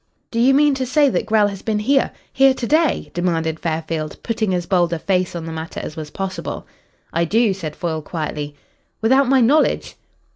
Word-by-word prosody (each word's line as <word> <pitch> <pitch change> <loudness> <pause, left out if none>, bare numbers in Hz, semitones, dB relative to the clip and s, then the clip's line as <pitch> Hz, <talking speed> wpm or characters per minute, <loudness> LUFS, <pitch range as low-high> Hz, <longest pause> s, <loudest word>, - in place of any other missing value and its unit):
"Do 230 - -1
you 260 +3 +5
mean 295 0 +4
to 265 -1 -2
say 285 +2 +4
that 235 - -1
Grell 215 -2 +3
has 195 -2 -8
been 220 -2 -1
here 270 +6 +2 0.2
here 270 0 +5
to 245 - -3
day?" 310 +4 +1
demanded 165 -3 -1
Fairfield, 160 -2 -3
putting 220 -3 -1
as 175 -1 -1
bold 175 -2 +2
a - - 0
face 185 +1 0
on 165 -1 -5
the 165 - -5
matter 160 0 -6
as 155 - -6
was 155 -2 -6
possible. 190 +2 -5 0.5
"I 170 - +2
do," 215 +4 +2
said 165 -5 -6
Foyle 160 -3 -3
quietly. 150 -2 -5 0.4
"Without 260 +4 +3
my 265 -1 +5
knowledge?" 285 +7 +2
195 Hz, 195 wpm, -20 LUFS, 165-250 Hz, 0.5 s, you